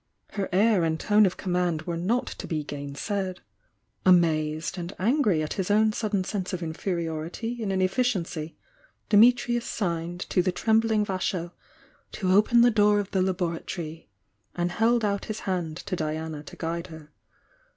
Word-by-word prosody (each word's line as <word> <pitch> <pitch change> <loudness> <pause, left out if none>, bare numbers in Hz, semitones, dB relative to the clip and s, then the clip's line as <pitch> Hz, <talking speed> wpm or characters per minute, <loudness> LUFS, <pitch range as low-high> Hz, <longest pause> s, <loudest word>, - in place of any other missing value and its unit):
Her 200 -2 -3
air 200 0 +3
and 160 -1 0
tone 210 -1 +4
of 180 - -4
command 175 -4 -1
were 170 0 -3
not 205 +9 0
to - - -7
be 155 -3 -2
gainsaid. 150 +7 -4 0.6
Amazed 160 -2 +2
and 175 +2 -6
angry 210 - +2
at 155 - -3
his 190 -1 -3
own 215 +1 +4
sudden 210 -3 -1
sense 190 -1 -4
of 180 -1 -3
inferiority 170 +7 -3
and 205 -3 -1
inefficiency, 185 -5 -1 0.5
Dimitrius 240 +2 +4
signed 175 -3 -3
to 180 - +3
the 185 +1 0
trembling 220 +2 +2
Vasho 185 -3 -2 0.6
to 185 -2 -1
open 215 +5 +5
the 240 0 +6
door 210 -1 +4
of 205 -1 -4
the 190 - +1
labora 180 -3 -1
tory, 165 - -7 0.5
and 175 0 -1
held 225 +3 +2
out 200 -1 -1
his 215 0 -5
hand 175 -4 -2
to 185 - -4
Diana 155 -1 -3
to - - -10
guide 170 +1 -4
her. 160 -3 -12
185 Hz, 160 wpm, -26 LUFS, 165-210 Hz, 0.6 s, the